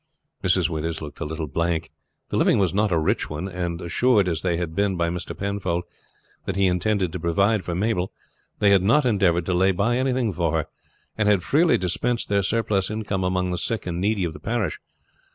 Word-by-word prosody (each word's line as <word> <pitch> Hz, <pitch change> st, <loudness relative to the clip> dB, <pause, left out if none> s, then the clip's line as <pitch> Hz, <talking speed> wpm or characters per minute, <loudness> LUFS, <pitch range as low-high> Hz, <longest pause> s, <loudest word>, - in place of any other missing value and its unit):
Mrs. -, -, +3 dB
Withers 80 Hz, 0 st, -3 dB
looked 75 Hz, -2 st, -9 dB
a -, -, -3 dB
little 80 Hz, +1 st, -4 dB
blank. 85 Hz, +2 st, -1 dB, 0.4 s
The -, -, -3 dB
living -, -, +3 dB
was 95 Hz, -4 st, +1 dB
not 105 Hz, +1 st, +1 dB
a 85 Hz, -, +3 dB
rich 80 Hz, -, 0 dB
one, 75 Hz, +5 st, -4 dB
and 90 Hz, -2 st, -3 dB
assured 100 Hz, +3 st, +2 dB
as 80 Hz, -3 st, -1 dB
they 90 Hz, -2 st, 0 dB
had 85 Hz, -2 st, -3 dB
been 100 Hz, +1 st, +1 dB
by 85 Hz, -1 st, +1 dB
Mr. 90 Hz, 0 st, -5 dB
Penfold 95 Hz, -3 st, -2 dB, 0.6 s
that 95 Hz, -, -2 dB
he 100 Hz, 0 st, +2 dB
intended 95 Hz, -1 st, +1 dB
to 90 Hz, -, -3 dB
provide 100 Hz, +5 st, +1 dB
for 85 Hz, 0 st, -3 dB
Mabel, 95 Hz, -1 st, 0 dB, 0.5 s
they 100 Hz, -1 st, +4 dB
had 100 Hz, -2 st, +5 dB
not 125 Hz, +9 st, +3 dB
endeavored 95 Hz, -7 st, +2 dB
to 90 Hz, -, 0 dB
lay 95 Hz, +2 st, +3 dB
by 105 Hz, +6 st, +1 dB
anything 130 Hz, -5 st, 0 dB
for 85 Hz, -2 st, 0 dB
her, 80 Hz, -2 st, 0 dB, 0.5 s
and 105 Hz, -, +2 dB
had 100 Hz, -4 st, +3 dB
freely 160 Hz, -, +3 dB
dispensed 115 Hz, +7 st, -1 dB
their 100 Hz, -1 st, +2 dB
surplus 100 Hz, -1 st, 0 dB
income 105 Hz, -3 st, -2 dB
among 90 Hz, 0 st, 0 dB
the 90 Hz, -, -2 dB
sick 110 Hz, +4 st, -2 dB
and 90 Hz, 0 st, -3 dB
needy 100 Hz, -1 st, +1 dB
of 85 Hz, -2 st, -2 dB
the -, -, -10 dB
parish. 110 Hz, -9 st, -2 dB
95 Hz, 210 wpm, -24 LUFS, 85-105 Hz, 0.6 s, had